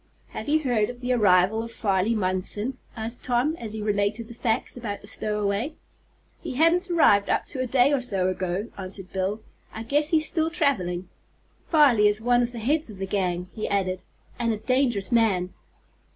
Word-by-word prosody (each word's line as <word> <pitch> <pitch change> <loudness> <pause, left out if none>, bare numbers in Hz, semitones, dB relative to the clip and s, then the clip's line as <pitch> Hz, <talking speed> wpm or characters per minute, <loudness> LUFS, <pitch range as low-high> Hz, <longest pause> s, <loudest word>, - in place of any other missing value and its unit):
"Have - - -6
you 310 +1 +3
heard 235 -6 +1
of 245 0 -8
the 250 0 0
arrival 200 -1 +4
of 230 0 -7
Farley 200 0 0
Munson?" 205 +5 -1 0.2
asked 225 +2 -5
Tom, 255 +5 +1
as 220 -6 -7
he 215 -1 -4
related 210 +2 0
the 235 - -10
facts 225 -1 -1
about 215 -5 -5
the - - -13
stowaway. 210 +6 -2 0.7
"He 305 -7 -5
hadn't 340 +5 +3
arrived 210 - +4
up - - +1
to 270 - -5
a 255 - -1
day 260 +3 +3
or 275 - +1
so 195 -7 0
ago," 185 +3 -2
answered 190 0 -5
Bill. 195 +3 -2 0.3
"I 220 - -6
guess 295 +6 +1
he's 315 -1 +3
still 320 -1 0
traveling. 190 - -1 0.6
Farley 270 -10 +5
is 210 +1 +1
one 245 +2 +3
of 240 0 -1
the 240 - -9
heads 290 +6 0
of 210 - -10
the 195 - -3
gang," 180 -2 -2
he 215 - -4
added, 185 -2 -1 0.4
"and 235 -1 +1
a 220 - -1
dangerous 240 -4 0
man." 200 -6 +2
220 Hz, 190 wpm, -25 LUFS, 200-255 Hz, 0.7 s, Farley